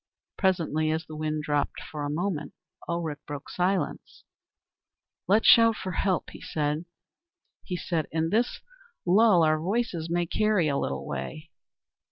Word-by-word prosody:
Presently, 165 -5 +1
as 160 +1 -1
the 155 - -9
wind 155 0 -2
dropped 145 -1 -1
for 150 -1 -6
a 145 - -2
moment, 160 -1 -2 0.3
Ulrich 170 -4 -2
broke 145 -1 -7
silence. 180 -2 -2 1.0
"Let's 210 +4 +4
shout 230 -1 +7
for 185 - -5
help," 185 +1 0
he - - -11
said, 170 - -5
"in 160 +1 -1
this 235 +3 +1 0.4
lull 190 -1 +5
our 155 0 +3
voices 180 -2 -1
may 175 +1 +1
carry 210 -2 +2
a 140 - +1
little 70 0 -3
way." 110 - -6
165 Hz, 135 wpm, -27 LUFS, 155-190 Hz, 1.0 s, shout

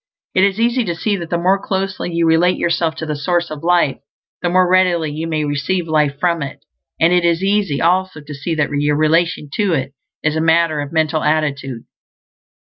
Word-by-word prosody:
It 185 - +3
is 195 +1 +1
easy 240 +2 +2
to 170 -3 -2
see 205 +4 -1
that 170 -3 -7
the 170 - 0
more 190 +3 +1
closely 190 -2 -3
you 170 0 +1
relate 165 +3 +3
yourself 170 -1 0
to 160 - -5
the 155 -1 -3
Source 175 +3 -1
of 155 0 -7
Life 170 -5 +2 0.4
the 175 - 0
more 185 +1 +3
readily 175 -4 +2
you 160 +2 -4
may 155 -2 -1
receive 165 +5 -1
life 150 -3 +1
from 170 -1 +1
it; 140 - -7 0.3
and 170 +2 +4
it 180 -1 +3
is 170 +1 +1
easy 195 -7 +1
also 185 0 +1
to 150 0 -10
see 145 +4 -3
that 150 -2 0
your 145 +1 +1
relation 155 -1 +1
to 205 -4 +1
It 135 -2 -2 0.3
is 155 0 +1
a 160 - 0
matter 165 -1 +2
of 145 0 -6
mental 160 -1 +1
attitude. 140 -5 -1
165 Hz, 210 wpm, -18 LUFS, 150-180 Hz, 0.4 s, and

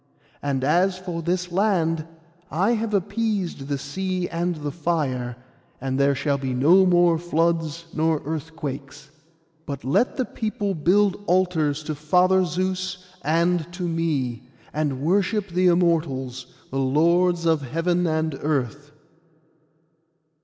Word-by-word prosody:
And 135 -2 -1
as 180 +6 +2
for 180 -2 -5
this 180 +1 -1
land, 170 -5 +1 0.4
I 190 +8 +1
have 225 -1 -1
appeased 200 -6 -1
the 140 -1 -1
sea 185 +6 -3
and 175 +1 -1
the 150 -1 -4
fire, 140 -7 -1 0.4
and 135 +1 -2
there 140 0 +3
shall 140 +1 0
be 130 -2 -2
no 175 +9 +5
more 175 -2 +4
floods 165 -1 0
nor 160 -1 +1
earthquakes. 145 -2 -6 0.6
But 140 -2 -5
let 145 - +1
the 260 - +1
people 215 -3 -3
build 195 +5 +2
altars 165 -5 +1
to 155 0 -3
Father 180 +5 +3
Zeus, 185 +1 -2 0.2
and 170 +1 +1
to 180 +1 -5
me, 150 -8 -2 0.2
and 145 -3 -1
worship 200 +4 +1
the 180 +1 +2
Immortals, 150 -8 +1 0.2
the 135 - -1
Lords 170 +6 +2
of 160 -2 +3
heaven 170 +6 0
and 160 -2 -1
earth. 145 0 -2
165 Hz, 130 wpm, -24 LUFS, 145-180 Hz, 0.6 s, no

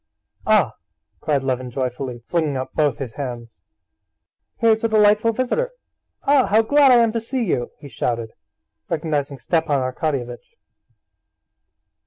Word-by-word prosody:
"Ah," - - +3 0.4
cried 145 -3 0
Levin 130 -1 -2
joyfully, 125 -1 -4
flinging 155 -5 -1
up 130 - -5
both 145 -6 +1
his 125 -5 -6
hands. 120 -6 -7 1.0
"Here's 220 -1 +3
a - - +3
delightful 215 +1 +4
visitor! 255 - -1 0.5
Ah, 275 -2 +4
how 220 +2 +4
glad 285 +3 +5
I - - +7
am 230 -2 +4
to 230 0 -2
see 250 +2 -2
you!" 120 - -1
he 145 - -11
shouted, 115 -2 -3 0.6
recognizing 150 -3 -2
Stepan 150 +3 0
Arkadyevitch. 130 - -4
150 Hz, 130 wpm, -21 LUFS, -, 1.0 s, I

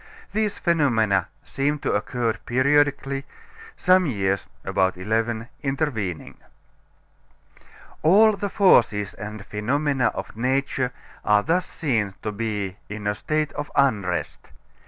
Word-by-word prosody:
These 215 -1 0
phenomena 115 - +2 0.2
seem 145 +2 -1
to - - +1
occur 115 +2 0
periodically; 140 +1 +2 0.5
some 185 -1 +4
years 100 -6 -1 0.2
(about 95 -1 +1
eleven) 110 +4 -1
intervening. 135 - -2 1.6
All 210 +7 +6
the 200 +1 -3
forces 110 - +3
and 105 -1 -8
phenomena 135 +5 0
of - - -6
nature 130 +1 0 0.3
are 105 -1 +3
thus 175 +4 +1
seen 110 - -1
to 105 - -2
be 105 -3 -3
in 105 0 -6
a 105 - +1
state 155 +7 -2
of 145 -1 -5
unrest. 100 - 0
120 Hz, 115 wpm, -24 LUFS, 105-145 Hz, 1.6 s, All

